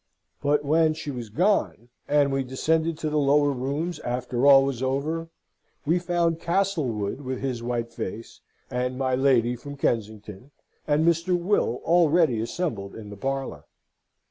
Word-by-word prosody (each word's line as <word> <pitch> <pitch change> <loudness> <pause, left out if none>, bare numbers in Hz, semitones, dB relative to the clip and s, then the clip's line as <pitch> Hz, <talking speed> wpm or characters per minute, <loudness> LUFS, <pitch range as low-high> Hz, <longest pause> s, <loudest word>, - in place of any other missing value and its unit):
But 145 0 +1
when 155 +1 +3
she 155 -2 -5
was 120 -4 -6
gone, 170 - 0 0.2
and 145 -1 +3
we 135 0 0
descended 160 +5 0
to 155 - -2
the 150 - +1
lower 145 0 +3
rooms 140 +7 -3
after 125 +1 -1
all 135 -1 +8
was 135 -3 -3
over, 150 +5 -2 0.6
we 165 +4 +2
found 170 -2 0
Castlewood 160 - -1
with 130 -1 -4
his 130 -3 -3
white 120 -1 -3
face, 110 +5 -7 0.3
and 125 +1 -2
my 130 -1 0
lady 125 -2 +3
from 140 +4 -9
Kensington, 110 -2 -3 0.4
and 150 +2 +2
Mr. 170 +2 +2
Will 175 - 0
already 165 -7 +3
assembled 115 - -4
in 105 -2 -9
the - - -7
parlour. 135 +5 -4
140 Hz, 150 wpm, -25 LUFS, 125-160 Hz, 0.6 s, all